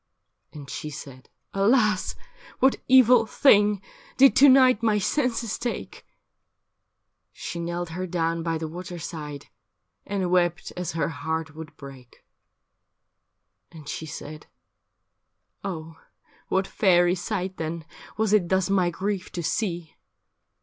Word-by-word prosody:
And 145 -2 -10
she 150 - -6
said, 135 -3 -10
' - - -49
Alas! 215 -4 +2 0.4
what 265 0 +2
evil 250 -3 +6
thing 210 -7 +4 0.3
Did 275 0 +6
to 280 +2 +8
night 255 -4 +6
my 220 -2 +2
senses 235 0 -1
take? 240 0 -5 0.6
' - - -55 0.5
She 170 - -6
knelt 170 0 -3
her 180 +3 -4
down 165 -1 -1
by 165 0 -1
the 160 0 -4
water 175 +2 -7
side 150 -4 -7 0.6
And 190 -3 -2
wept 175 -2 +1
as 180 -1 -4
her 165 - -1
heart 160 +1 -4
would 160 0 -10
break. 135 -3 -13 1.5
And 155 -3 -13
she 160 +2 -5
said, 155 0 -9 0.6
' - - -52
Oh, 165 -4 -6 0.5
what 190 0 +1
fairy 175 -3 +3
sight 185 0 -3
then 160 0 -4 0.3
Was 220 -1 +1
it 185 -5 +3
thus 190 0 +1
my 185 -3 +3
grief 190 +2 -3
to 175 - -4
see 175 -3 -2
175 Hz, 135 wpm, -25 LUFS, 160-210 Hz, 1.5 s, to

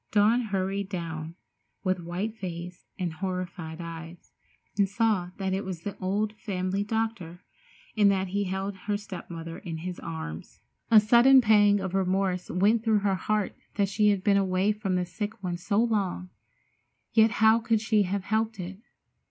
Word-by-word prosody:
Dawn 220 +4 +4
hurried 195 -1 -2
down, 165 -3 -5 0.5
with 185 -2 0
white 180 +6 -4
face 180 -3 -7
and 180 -4 -2
horrified 180 -2 -5
eyes, 165 0 -9 0.4
and 200 -1 +2
saw 205 -4 +1
that 190 -1 -1
it 195 +2 -1
was 185 -3 -5
the 205 - -4
old 205 +3 -1
family 195 -2 -2
doctor, 205 -5 -3 0.5
and 205 -2 +5
that 190 -1 0
he 200 +2 -1
held 190 +1 -3
her 205 -1 +1
step 205 -3 -9
mother 165 -1 -7
in 165 -2 -6
his 180 +2 -6
arms. 80 0 -7 0.3
A 225 - +9
sudden 240 +5 +7
pang 205 -3 +5
of 190 -1 -4
remorse 190 -1 0
went 210 +5 +2
through 220 -3 +3
her 200 -1 +2
heart 210 +2 -1 0.2
that 200 -2 +1
she 210 +1 +3
had 200 -2 +1
been 200 -2 +4
away 190 +1 +2
from 205 -3 -2
the 180 0 0
sick 205 +4 -6
one 175 -1 -2
so 200 +4 -1
long, 195 -5 -1 0.8
yet 220 0 +5
how 220 +1 +5
could 225 -1 +1
she 215 0 +2
have 195 0 -1
helped 220 +1 -1
it? 185 +2 -6
195 Hz, 170 wpm, -27 LUFS, 180-210 Hz, 0.8 s, A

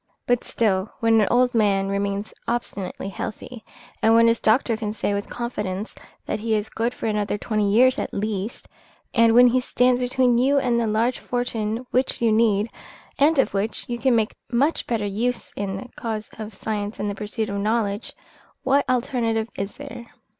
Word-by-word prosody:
But 245 -1 +1
still, 200 -3 0
when 225 -1 +4
an 205 - +2
old 250 0 +3
man 200 -4 +2
remains 200 +1 -2
obstinately 205 -6 -3
healthy, 220 +3 -7 0.4
when 225 +1 +5
his 230 0 +3
doctor 230 +1 +3
can 215 -1 -3
say 205 -1 -1
with 200 0 -3
confidence 210 -4 -4 0.3
that 215 - -2
he 220 0 0
is 210 0 -2
good 230 +2 -1
for - - -6
another 210 -2 0
twenty 210 -1 0
years 255 +4 +5
at - - -3
least, 210 +1 -3 0.5
and 230 -1 +5
when 245 +1 +8
he 255 +2 +3
stands 250 0 +2
between 250 -1 +2
you 275 +3 +3
and 240 -3 +2
a 230 - 0
large 225 +4 +1
fortune 235 -1 -2
which 255 +1 +1
you 230 -2 +3
need, 215 -1 +2 0.5
and 300 +3 +4
of 270 - +2
which 205 +3 -2
you 240 -1 -3
can 260 -2 +3
make 220 -2 +1 0.2
much 275 +7 +1
better 225 -3 -1
use 230 +5 -2
in 195 -1 -3
the 200 - -8
cause 220 -6 -4
of 215 -2 -7
science 210 0 -4
and 205 - -1
the 205 - -1
pursuit 215 +2 -3
of 200 0 -2
knowledge, 210 0 -1 0.5
what 275 0 +2
alternative 235 -3 0
is 200 +1 -4
there? 235 0 -9
225 Hz, 180 wpm, -23 LUFS, 210-245 Hz, 0.5 s, when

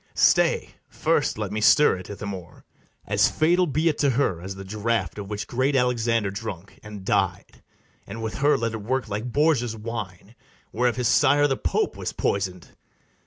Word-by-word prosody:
BARABAS. - - -6
Stay; - - +3 0.2
first - - 0
let 105 -2 -3
me 110 +1 -2
stir 150 +5 +5
it, 90 - -10
Ithamore. 100 -4 -7 0.4
As - - +3
fatal 175 +3 +2
be 155 +3 0
it 155 - +1
to 145 - +3
her 115 -10 0
as 95 +2 -6
the 95 - -8
draught 110 +2 -2
Of 100 -1 -7
which 105 -1 -4
great 130 +3 0
Alexander 115 -4 +1
drunk, 100 -3 -7
and 105 -3 -10
died; - - -1 0.5
And 115 +3 -7
with 110 +3 -4
her 145 0 +4
let 115 -2 -2
it 110 - -5
work 130 +5 -2
like 105 +4 -4
Borgia's 135 -5 +2
wine, 110 -3 -7 0.4
Whereof 120 -2 +1
his 125 -1 0
sire 145 +6 +4
the 135 -2 +1
Pope 85 -9 -1
was - - -5
poisoned! 95 -3 -2
115 Hz, 180 wpm, -24 LUFS, 100-130 Hz, 0.5 s, stir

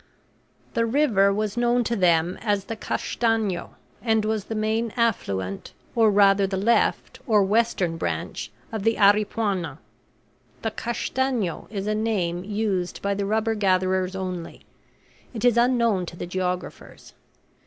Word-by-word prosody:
The 230 -1 +1
river 225 -7 +3
was 210 0 -1
known 240 0 +2
to 235 +1 -1
them 175 -2 +2
as 205 -3 0
the 225 - -5
Castanho, 220 -4 -1 0.3
and 220 -2 +1
was 215 -2 -1
the 225 - -5
main 220 +2 0
affluent 100 - -1 0.2
or 225 -2 +5
rather 200 -1 +4
the 190 0 -2
left 225 +5 +1
or 210 -4 +4
western 195 -5 +1
branch, - - -4 0.2
of 220 -2 -3
the 225 +2 +2
Aripuanan; 200 -6 +2 0.9
the - - -1
Castanho 240 -5 -2
is 200 -2 -4
a 210 - 0
name 195 -6 -1
used 200 -3 -2
by 200 0 +1
the 200 0 -2
rubber 220 +1 +1
gatherers 185 -2 +1
only; 185 -3 -6 0.7
it 225 - -2
is 245 -2 +5
unknown 235 -6 +2
to 170 - -8
the - - -5
geographers. 180 0 -5
205 Hz, 140 wpm, -24 LUFS, 185-225 Hz, 0.9 s, or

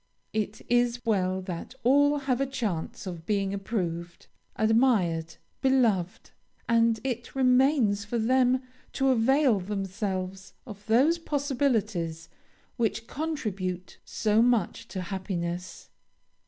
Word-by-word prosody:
It 215 -1 -3
is 240 0 +1
well 190 -4 +1
that 180 +6 -6
all 285 +4 +4
have 270 -2 -1
a 275 - +1
chance 215 -11 -3
of 170 -3 -7
being 200 -2 0
approved, 175 -4 -4 0.3
admired, 215 -9 +2 0.3
beloved, 235 -10 +1 0.4
and 230 -1 +3
it 245 -2 -4
remains 255 -5 +3
for 210 +4 -3
them 255 +2 +2 0.3
to 270 0 +1
avail 260 -1 +3
themselves 190 -1 -4
of 205 -4 -10
those 275 +10 +4
possibilities 230 - -1 0.5
which 225 -1 -1
contribute 200 - -4
so 215 0 +1
much 230 -2 +1
to 190 - -5
happiness. 180 -1 -5
220 Hz, 110 wpm, -27 LUFS, 190-255 Hz, 0.5 s, all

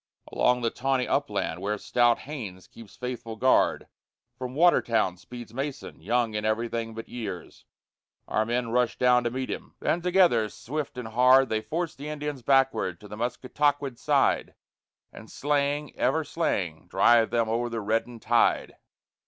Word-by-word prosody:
Along 125 0 +2
the 115 -1 0
tawny 130 0 0
upland - - -1
where 105 +1 -1
stout 120 +3 +2
Haynes 110 -11 -7
keeps 115 -3 -14
faithful 120 -2 -5
guard 130 +4 +2 0.5
From 125 +1 -6
Watertown 115 - +3
speeds 120 +3 -10
Mason, 135 - -5
young 115 +4 0
in 105 0 -2
everything 115 +1 -2
but 115 - -7
years; 105 -7 -7 0.6
Our 110 - +1
men 120 +1 -1
rush 125 0 +1
down 125 -1 +4
to - - +2
meet 130 +2 -4
him; - - -7
then, 170 - 0
together, 175 - +3
swift 145 +3 -5
and 120 -3 -5
hard, 130 +3 +5
They 110 0 0
force 165 +6 -3
the 145 +2 -8
Indians 150 -2 -4
backward 135 -9 +2
to 105 - -11
the 105 - -8
Musketaquid's 135 +3 -1
side, - - +1 0.6
And - - -12
slaying, 145 0 -1
ever 160 +6 +1
slaying, 95 - -2
drive 115 -1 +4
them 115 -1 +1
o'er 120 +2 -1
the 115 -1 -3
reddened 115 +2 -2
tide. 120 0 +2
120 Hz, 155 wpm, -27 LUFS, 115-135 Hz, 0.6 s, hard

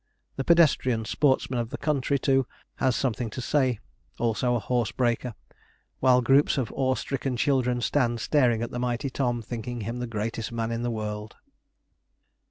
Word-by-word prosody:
The 135 - -2
pedestrian 130 -8 +3
sportsman 130 -1 +1
of 115 -1 -2
the - - -5
country, 140 -2 0
too, 135 -1 +2 0.3
has 130 -2 +2
something 120 -3 -1
to 110 - -7
say; 130 -2 +1 0.4
also 120 +1 +1
a - - +1
horse 120 0 -1
breaker; 120 -1 -1 0.6
while 125 -1 +4
groups 140 +4 +4
of 130 -5 -1
awe 130 -1 +1
stricken 135 -2 -3
children 125 -2 +1
stand 120 -3 +1
staring 120 -3 +2
at 120 - -4
the 120 - -4
mighty 125 +2 -2
Tom, 120 -4 -1
thinking 120 +1 -5
him 115 +4 -4
the 125 - -3
greatest 115 +1 -3
man 115 -1 -2
in 115 0 -2
the 120 - -1
world. 105 -1 -5
125 Hz, 170 wpm, -26 LUFS, 115-130 Hz, 0.6 s, while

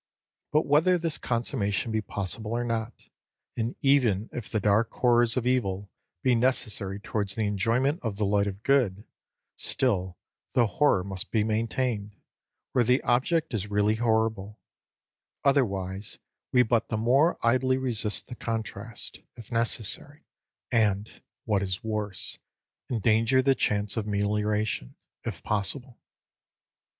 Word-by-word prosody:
But 155 +1 +3
whether 160 +6 +4
this 165 -2 -2
consummation 115 -3 -1
be 110 0 0
possible 105 +2 -4
or 120 +1 0
not, 115 0 -4 0.5
and 115 +1 -2
even 120 -7 +3
if 120 -3 -6
the 110 - 0
dark 105 +3 +2
horrors 120 -1 +3
of 125 - 0
evil 100 -6 0 0.3
be 130 - +4
necessary 110 -5 0
towards 100 -2 -2
the 110 - 0
enjoyment 115 - +1
of 110 -4 -3
the 105 +1 0
light 100 0 +2
of 100 +1 -6
good, 115 -8 +2 0.5
still 95 -8 0 0.4
the 120 - +4
horror 110 -3 +2
must 95 -1 -6
be 110 -2 +2
maintained, 110 -1 -1 0.6
where 125 - +3
the 125 +3 +2
object 130 +6 +1
is 105 -2 -2
really 105 +1 +2
horrible; 110 -2 0 0.8
otherwise, 100 -8 0 0.3
we 125 -1 +5
but 115 -1 +1
the 110 - -2
more 135 +10 +3
idly 130 +2 +3
resist 115 -5 0
the - - -9
contrast, 115 -2 -5 0.2
if 115 -4 -12
necessary 115 +4 -1 0.5
and, 105 -3 +1 0.2
what 105 -3 +1
is 95 +1 -2
worse, 105 -3 -4 0.5
endanger 115 +3 +3
the 135 0 +5
chance 105 -4 0
of 110 -2 -2
melioration, 105 - -1 0.3
if - - -5
possible. 115 +5 -3
110 Hz, 135 wpm, -27 LUFS, 105-125 Hz, 0.8 s, we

